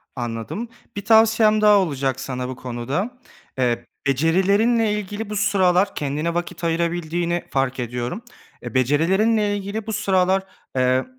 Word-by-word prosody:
Anladım. 120 - -4 0.3
Bir 205 -1 -5
tavsiyem 220 -1 +5
daha 210 -1 +6
olacak 140 -8 0
sana 130 -1 -4
bu 130 - -5
konuda. 130 - -4 0.4
Eee, 120 -2 0 0.2
becerilerinle 200 - +2
ilgili 210 +1 -4
bu 210 - -4
sıralar 195 -1 +2
kendine 150 +4 -2
vakit 175 +1 -4
ayırabildiğini 170 +1 -1
fark 135 -1 -1
ediyorum. 125 - -4 0.4
Eee, - - -6
becerilerinle 190 - +2
ilgili 205 +2 -5
bu 220 - -3
sıralar, 190 -1 +2 0.3
eee, 130 0 +2
175 Hz, 130 wpm, -22 LUFS, 135-205 Hz, 0.4 s, daha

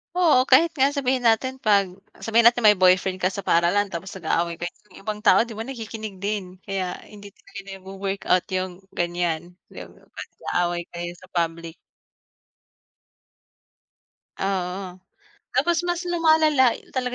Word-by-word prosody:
Oo, 315 -8 +4
kahit 325 +6 +5
nga 270 +1 +5
sabihin 255 -3 +1
natin, 260 +4 +1
'pag 200 -5 +2 0.3
sabihin 230 +1 +5
natin, 240 0 +3
may 210 -2 +6
boyfriend 185 0 +3
ka 185 - +2
sa 195 +1 -5
paaralan, 180 +5 +2
tapos 185 +4 -6
nag-aaway 170 -1 -1
kayo, 175 +1 -5 0.2
yung 185 - -17
ibang 210 0 -4
tao, 220 - +5
'di 235 - -10
ba, 225 +2 -5
nakikinig 220 -5 -7
din, 200 -3 -3
kaya 190 -2 -3 0.2
hindi 205 -1 -11
din 195 0 -10
nagwo-workout 195 -1 -2
yung 185 -1 -3 0.2
ganyan, 175 -1 -2 0.2
yung - - -10
'pag - - -11
nag-aaway 175 0 -1
kayo 175 0 -6
sa 185 - -16
public. 165 -1 -2 2.6
Oo. 185 -1 -3 0.6
Tapos 345 0 +1
mas 350 0 -1
lumalala 315 -6 +4 0.2
talaga 250 -1 -2
195 Hz, 140 wpm, -23 LUFS, 180-240 Hz, 2.6 s, may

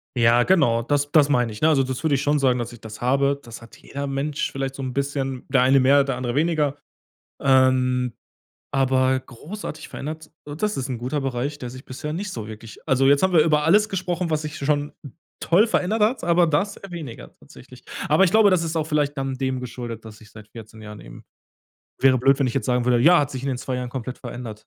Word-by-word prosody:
Ja, 120 0 +4
genau, 120 -11 +3
das 145 +3 -1
das 145 -2 +4
meine 125 -5 +1
ich 105 - -10
ne? 155 - +4
Also, 140 -4 +3
das 130 +3 -5
würde 150 -3 +2
ich 135 - -1
schon 145 0 +2
sagen, 130 -2 +2
dass 120 0 -5
ich 120 - -14
das 110 0 -10
habe. 140 +2 +1
Das 115 -2 -10
hat 115 - -15
jeder 140 +1 -6
Mensch 140 +2 -2
vielleicht 135 0 -4
so 135 - -7
'n 130 -1 -4
bisschen, 135 -1 -3
der 135 -2 +3
eine 135 +2 +5
mehr, 140 +2 +5
der 135 -2 -2
andere 125 -1 -3
weniger. 150 -2 +1 0.7
Ähm, 130 -2 +3 0.6
aber 130 -1 +2
großartig 155 - -9
verändert 155 +2 -7
so 145 - -7
das 210 +6 -2
ist 130 0 -3
'n 125 -3 -4
guter 130 +5 -3
Bereich, 135 +2 -3
der 125 -3 -6
sich 130 +1 -11
bisher 145 +4 -6
nicht 200 +4 -4
so 110 -2 -6
wirklich 110 +1 -11
also 135 0 +3
jetzt 140 +3 +4
haben 190 -1 +2
wir 165 - +6
über 150 -2 +2
alles 210 +6 +4
gesprochen, 180 -3 -2
was 155 -1 0
sich 150 0 -6
schon 145 +1 -1 0.5
toll 195 +7 +4
verändert 215 +1 0
hat, 225 +2 +1
aber 170 0 +3
das 195 +7 0
eher 195 - -11
weniger 160 -9 -9
tatsächlich. 125 -1 -16 0.3
Aber 155 +6 +5
ich 180 - +2
glaube, 215 0 +5
das 185 -3 +2
ist 165 0 -3
auch 155 - 0
vielleicht 150 -2 0
dann 135 0 -2
dem 130 -1 -2
geschuldet, 120 -2 -7
dass 110 0 -12
ich 110 - -17
seit 110 -1 -14
14 110 -1 -12
Jahren 105 -1 -10
eben - - -13 0.7
wäre 130 -1 +4
blöd, 135 +3 +3
wenn 140 - +1
ich 120 - -3
jetzt 135 - -1
sagen 125 -1 +1
würde: 125 -1 +3
„Ja, 170 +7 +6
hat 145 -1 0
sich 130 -2 -6
in 140 - -3
den 130 - -2
2 130 0 -4
Jahren 125 -1 -4
komplett 130 0 -6
verändert.“ 115 -4 -8
135 Hz, 235 wpm, -23 LUFS, 125-150 Hz, 0.7 s, wir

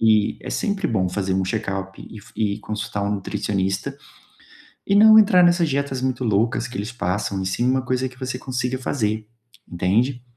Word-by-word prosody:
e 110 -2 +3
é - - -6
sempre 205 -2 -1
bom 95 -5 0
fazer 95 +1 -2
um 95 0 +1
check-up 95 -1 -3
e 110 - -10
f 105 - -16
e 105 -1 0
consultar 105 -1 -4
um 100 - -1
nutricionista, 95 0 -2 0.9
e 200 - +2
não 220 +1 +8
entrar 185 -4 +6
nessas 175 -2 +3
dietas 140 -2 -2
muito 130 -1 -1
loucas 115 +3 +1
que 125 - -8
eles 105 +4 -4
passam, 100 -3 -2
e - - -3
sim 95 +6 -1
uma 130 0 +2
coisa 130 +1 -1
que 125 0 -17
você 130 -1 -4
consiga 130 0 -3
fazer, 110 -5 -2 0.4
entende? 115 +9 0
115 Hz, 185 wpm, -22 LUFS, 100-130 Hz, 0.9 s, não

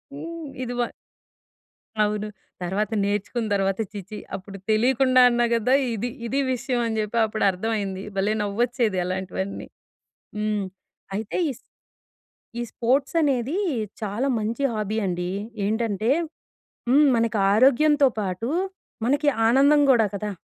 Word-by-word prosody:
హ్మ్, 330 +1 -7 0.2
ఇది 245 0 -4
బా 240 - +1 1.2
అవును. 210 0 -1 0.4
తర్వాత 195 +4 -1
నేర్చుకున్న 205 +3 -1
తర్వాత 195 0 0
ఛీ! 205 - -6
ఛీ! 215 - -6 0.2
అప్పుడు 195 +1 -8
తెలియకుండా 255 +3 +4
అన్నా 240 0 +2
కదా! 230 +3 +2 0.2
ఇది, 230 +3 -2 0.2
ఇది 270 +4 0
విషయం 250 0 -2
అని 220 - -2
చెప్పి 215 +2 -2
అప్పుడు 215 0 -3
అర్థమయింది. 195 -1 -3
భలే! 195 +2 +1
నవ్వొచ్చేది 230 0 0
అలాంటివన్నీ. 190 +1 -4 0.7
హ్మ్. 210 -1 0 0.5
అయితే 215 0 -4
ఈస్ 255 - -9 1.0
ఈ - - -1
స్పోర్ట్స్ 270 +6 +1
అనేది 275 +2 +1 0.5
చాలా 215 +6 -1
మంచి 225 +5 -2
హాబీ 215 -1 -2
అండి. 180 0 -2 0.3
ఏంటంటే, 220 +1 0 0.8
హ్మ్, 290 +4 +6
మనకి 230 -1 +1 0.2
ఆరోగ్యంతో 275 +5 +5
పాటు 195 +3 -2 0.6
మనకి 290 +4 +3 0.2
ఆనందం 280 +5 +5
కూడా 230 -4 +4
కదా! 205 +1 -3
220 Hz, 125 wpm, -24 LUFS, 205-255 Hz, 1.2 s, హ్మ్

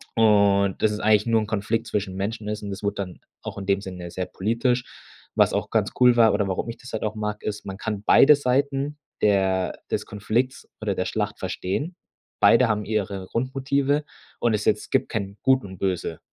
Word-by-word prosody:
Und 100 -3 +4
dass 110 - +5
es 105 - -3
eigentlich 105 0 +3
nur 115 -1 +3
'n - - -3
Konflikt 110 +2 -1
zwischen 100 -4 -2
Menschen 105 +3 -3
ist 105 0 -4
und 100 - -5
das 95 - -6
wurde 100 0 -1
dann 95 -3 -5 0.2
auch - - -6
in 95 - -6
dem 100 0 +2
Sinne 90 -3 -7
sehr 90 +1 -3
politisch. 120 +5 0 0.5
Was - - +4
auch - - -1
ganz - - +1
cool 125 -1 +6
war 115 -2 +6
oder 100 -1 +1
warum 95 +4 -2
ich 115 - -6
das 130 - -12
halt 110 - -3
auch 110 -1 -1
mag, 105 0 -4
ist: 105 0 -4
Man 95 0 -5
kann 105 -1 -4
beide 150 +6 +7
Seiten 140 +2 0 0.2
der 95 -2 +2
des - - -1
Konflikts 120 +6 -2
oder 105 -2 -1
der 95 - -1
Schlacht 105 -1 -2
verstehen. 95 - -3 0.5
Beide 120 +1 +6
haben 105 -1 0
ihre 100 -3 -2
Grundmotive 135 +3 0 0.4
und 120 -2 +2
ist 105 0 -1
jetzt - - 0
gibt - - +1
kein 100 +1 -4
Gut 130 0 +4
und 95 -2 -10
Böse 90 -4 -2
105 Hz, 205 wpm, -24 LUFS, 100-120 Hz, 0.5 s, beide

